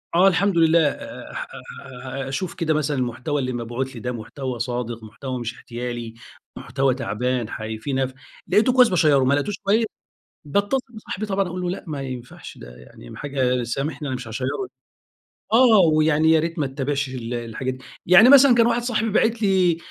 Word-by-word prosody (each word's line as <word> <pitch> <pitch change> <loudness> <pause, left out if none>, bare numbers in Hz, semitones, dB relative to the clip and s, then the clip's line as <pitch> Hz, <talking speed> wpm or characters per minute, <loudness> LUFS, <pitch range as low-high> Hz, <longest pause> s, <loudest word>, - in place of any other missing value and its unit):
آه 180 +3 +6
الحمد 195 0 +2
لله 165 0 +5
آآ، - - -7 0.5
آآ، 135 +1 -7
أشوف 155 +7 -3
كده 160 -3 0
مثلًا 150 -2 -1
المحتوى 125 +4 -2
اللي 130 -1 -2
مبعوت 120 +2 -4
لي 115 - -8
ده 125 +3 -3
محتوى 125 +2 -6
صادق، 120 -1 -3
محتوى 125 +4 -6
مش 120 0 -4
احتيالي، 120 -2 -6 0.4
محتوى 135 -2 0
تعبان، 125 -1 -2
حي 110 0 -5
في 135 +6 -5
نا 130 0 -1 0.3
لقيتُه 245 +4 +3
كويس 250 -2 +6
باشيره 150 -7 +3
ما 135 +2 +3
لقيتوش 185 +7 -1
كويس 220 +3 +2 0.6
باتصّل 200 - +1 0.2
بصاحبي 215 -1 -5
طبعًا 195 -2 0
أقول 180 +1 -5
له 180 - -2
لأ 185 - -5
ما 145 -3 -4
ينفعش، 125 -2 -8
ده - - -12
يعني 60 -1 -13
حاجة 130 -3 0
سامحني 140 +5 -3
أنا 130 - -2
مش 125 -1 -7
هاشيره 125 +3 -3 1.1
آه، 230 -2 +6
ويعني 155 0 +3
يا 160 - +5
ريت 165 +1 -3
ما 145 - +1
تتابعش 140 0 -2
ال 125 -2 -5
الحاجات 120 +2 -4
دي، 130 - -13 0.2
يعني 190 +8 +7
مثلًا 275 -2 +8
كان 230 -1 +5
واحد 235 0 +1
صاحبي 225 -2 -1
باعت 225 +2 +1
لي 185 -5 +3
140 Hz, 180 wpm, -22 LUFS, 125-180 Hz, 1.1 s, مثلًا